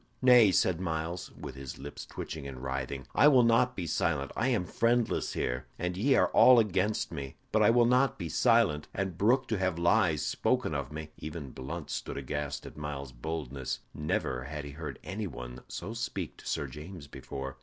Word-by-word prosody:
"Nay," 125 -5 +8
said 90 -1 +2
Myles, 85 0 -3
with - - -6
his 65 -1 -8
lips 70 +2 -8
twitching 75 -3 -6
and 65 -2 -8
writhing, 65 0 -3
"I 145 - +6
will 130 -4 +7
not 115 +2 +3
be 90 - -3
silent. 75 -3 0
I 115 - +1
am 115 -9 +1
friendless 115 +6 +1
here, 60 0 -2
and 90 0 -2
ye 130 +8 +3
are - - +4
all 125 -1 +7
against 105 -1 +1
me, 70 -4 -6 0.2
but 110 - +3
I 105 - +6
will 120 +1 +5
not 125 +2 +3
be 85 - -4
silent, 110 - +3
and 95 -2 -2
brook 125 +8 +3
to 110 -4 0
have 95 -3 0
lies 85 -4 +3
spoken - - 0
of 70 -1 -3
me." 75 0 -7
Even 75 -3 -6
Blunt 75 +5 -6
stood - - -4
aghast 70 +1 -4
at - - -10
Myles's 70 -3 -5
boldness. 65 -2 -4
Never 65 -4 -2
had 75 +1 -5
he 70 - -7
heard 75 +2 -6
any 100 +3 -4
one 60 -5 -8
so 100 +6 -6
speak 120 +1 -4
to - - -12
Sir - - -1
James 80 +1 -9
before. 65 -1 -7
80 Hz, 195 wpm, -30 LUFS, 70-110 Hz, 0.2 s, Nay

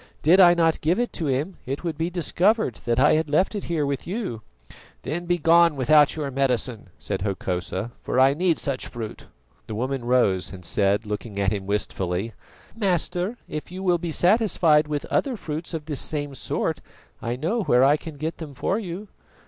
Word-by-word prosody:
Did 175 +5 +6
I 175 -2 +8
not 165 -2 +2
give 170 +7 +1
it 245 - -1
to 160 - -3
him, 145 +8 -1
it 135 +5 -4
would 165 -3 -2
be 165 +3 -1
discovered 180 - +1
that 120 0 +1
I 150 +3 +5
had 155 -1 +1
left 170 +8 +2
it 205 - -4
here 160 -4 0
with 140 +1 -3
you." 185 - -4 0.6
"Then 170 +4 -4
begone 170 -1 +4
without 145 +2 +4
your 145 -3 -3
medicine," 125 -5 -1
said 100 -1 -4
Hokosa, 95 +2 -3
"for 130 - -1
I 135 +1 +6
need 170 +1 +1
such 135 -3 -3
fruit." 115 -3 -7 0.4
The 110 - -5
woman 130 +3 -2
rose 120 -7 +2
and 90 -2 -10
said, 100 +4 +1
looking 105 0 -5
at 95 -1 +2
him 100 -2 -4
wistfully: 100 0 -2 0.4
"Master, 185 +1 -1
if 155 +2 -6
you 185 +1 -6
will 175 -2 +2
be 170 0 -4
satisfied 175 -5 +3
with 150 -1 -3
other 265 -5 0
fruits 160 -2 -5
of 160 -3 -5
this 150 -3 -2
same 145 -2 -3
sort, 130 - -2 0.4
I 120 +1 -2
know 170 - -1
where 125 -9 +4
I 140 +2 +5
can 155 -1 -8
get 160 +3 -4
them 150 -4 -8
for 195 - -1
you." 195 0 -6
150 Hz, 190 wpm, -24 LUFS, 120-175 Hz, 0.6 s, I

